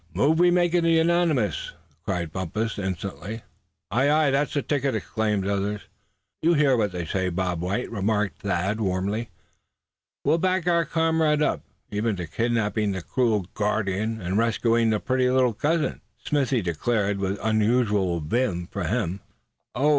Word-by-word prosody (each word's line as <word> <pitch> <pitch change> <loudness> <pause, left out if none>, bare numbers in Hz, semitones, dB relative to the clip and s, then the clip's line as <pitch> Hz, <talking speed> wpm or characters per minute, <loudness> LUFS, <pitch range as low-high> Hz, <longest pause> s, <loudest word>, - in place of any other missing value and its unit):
"Move 150 - +3
we 175 0 +6
make 175 -1 +2
it 175 -1 +3
unanimous!" 165 - +2 0.3
cried 85 -4 -2
Bumpus, 105 +6 -3
instantly. 95 +3 -5 0.5
"Ay, 130 +7 +2
ay! 150 -1 +3
that's 145 +2 0
the 140 - 0
ticket," 140 -4 0
exclaimed 105 -1 -1
others. 100 +1 -1 0.6
"You 170 +2 +3
hear 145 -3 +4
what 105 -4 +1
they 90 -2 -4
say, 95 +3 -1
Bob 90 -1 -2
White?" 100 +7 -2
remarked 105 -1 -1
Thad, 95 +2 -1
warmly. 100 +4 -1 1.0
"We'll 165 - +3
back 185 0 +1
our 170 -1 +3
comrade 160 -2 +2
up, - - 0 0.3
even 105 +1 0
to 90 -2 -4
kidnapping 110 +1 0
the 95 -2 -5
cruel 110 -5 +1
guardian, 105 +1 -1
and 95 +2 -1
rescuing 115 0 +2
the 110 -1 +1
pretty 130 +1 +1
little 125 -2 +3
cousin!" 155 +8 0 0.2
Smithy 135 -6 0
declared 100 +4 0
with 100 +1 -1
unusual 105 -5 +1
vim, 90 +1 -1
for - - -3
him. 90 +4 -1 0.6
"Oh!" 140 +5 +2
110 Hz, 150 wpm, -25 LUFS, 100-140 Hz, 1.0 s, we